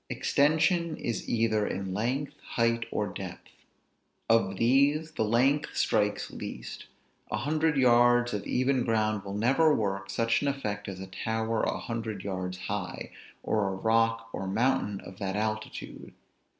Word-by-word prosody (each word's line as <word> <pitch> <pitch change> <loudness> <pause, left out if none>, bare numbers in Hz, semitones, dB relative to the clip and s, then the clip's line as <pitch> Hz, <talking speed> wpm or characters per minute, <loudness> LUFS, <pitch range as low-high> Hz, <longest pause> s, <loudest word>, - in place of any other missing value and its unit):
Extension 160 +3 +2
is 115 - -3
either 110 -2 +1
in 95 -1 -3
length, 125 +8 -1
height, 115 0 0
or 105 - -1
depth. 95 -2 -8 0.8
Of 115 -4 +3
these 140 +7 +3
the 110 - -1
length 130 +7 +2
strikes 105 -1 +1
least; - - -7 0.4
a - - -1
hundred 155 +5 +1
yards 120 -1 +4
of 105 - -2
even 130 0 +1
ground 110 -3 0
will 100 0 -6
never 135 +9 +4
work 100 -2 -2
such 115 +4 +1
an 145 - 0
effect 105 -7 -3
as 95 -2 -6
a 95 - -6
tower 110 +3 -2
a - - 0
hundred 110 -4 -4
yards 90 -2 -4
high, 100 0 -4 0.3
or 105 -2 +1
a 95 - -2
rock 115 +2 +1
or 95 - -4
mountain 105 -1 0
of 95 - -12
that 95 -1 -2
altitude. 110 +1 -4
115 Hz, 150 wpm, -29 LUFS, 100-125 Hz, 0.8 s, yards